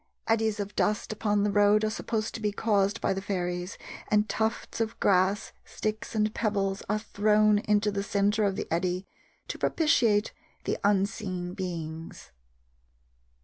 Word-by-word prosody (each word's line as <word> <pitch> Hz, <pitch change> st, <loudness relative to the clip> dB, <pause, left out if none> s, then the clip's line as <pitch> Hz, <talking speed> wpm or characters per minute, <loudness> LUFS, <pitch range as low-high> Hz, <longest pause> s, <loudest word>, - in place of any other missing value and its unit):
Eddies 220 Hz, -1 st, +1 dB
of 205 Hz, 0 st, -4 dB
dust 210 Hz, +1 st, 0 dB
upon 210 Hz, -1 st, +1 dB
the 205 Hz, -, +1 dB
road 205 Hz, +1 st, +4 dB
are 215 Hz, -, +2 dB
supposed 220 Hz, 0 st, -2 dB
to 225 Hz, -, -6 dB
be 210 Hz, -1 st, +1 dB
caused 205 Hz, 0 st, +1 dB
by -, -, +1 dB
the 190 Hz, -, -3 dB
fairies, 180 Hz, -2 st, -3 dB, 0.3 s
and 210 Hz, 0 st, +2 dB
tufts 220 Hz, +1 st, -2 dB
of 225 Hz, -1 st, -2 dB
grass, 195 Hz, +2 st, +2 dB
sticks, 215 Hz, +1 st, -4 dB
and 215 Hz, 0 st, +1 dB
pebbles 200 Hz, -4 st, -1 dB
are 210 Hz, -, +2 dB
thrown 210 Hz, 0 st, +3 dB
into 210 Hz, 0 st, +1 dB
the 200 Hz, 0 st, -2 dB
centre 205 Hz, +2 st, +1 dB
of 195 Hz, -1 st, 0 dB
the -, -, -3 dB
eddy 180 Hz, +2 st, -1 dB, 0.4 s
to -, -, -5 dB
propitiate 230 Hz, -10 st, +2 dB, 0.3 s
the -, -, -2 dB
unseen 190 Hz, -3 st, 0 dB
beings. 165 Hz, -4 st, -6 dB
205 Hz, 150 wpm, -28 LUFS, 195-215 Hz, 0.4 s, road